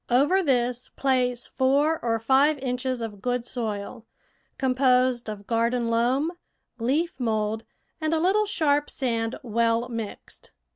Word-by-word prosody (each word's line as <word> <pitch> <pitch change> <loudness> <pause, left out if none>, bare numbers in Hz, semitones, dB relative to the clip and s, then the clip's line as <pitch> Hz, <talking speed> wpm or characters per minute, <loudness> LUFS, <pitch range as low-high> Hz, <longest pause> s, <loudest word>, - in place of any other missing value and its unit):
Over 285 +10 +4
this 250 -5 0
place 250 -3 0
four 280 +4 +2
or 230 -1 +1
five 275 +6 +3
inches 255 -2 -2
of 205 -3 -7
good 245 +1 -1
soil, 225 -1 -4 0.5
composed 255 -2 +2
of 205 -1 -7
garden 235 +1 0
loam, 255 +7 +1 0.5
leaf 275 +6 0
mould, 220 -2 -1 0.4
and 310 0 0
a 325 - +2
little 400 +5 +2
sharp 295 -6 +1
sand 230 -3 -1
well 230 0 +1
mixed. 230 -3 -7
250 Hz, 130 wpm, -25 LUFS, 230-275 Hz, 0.5 s, Over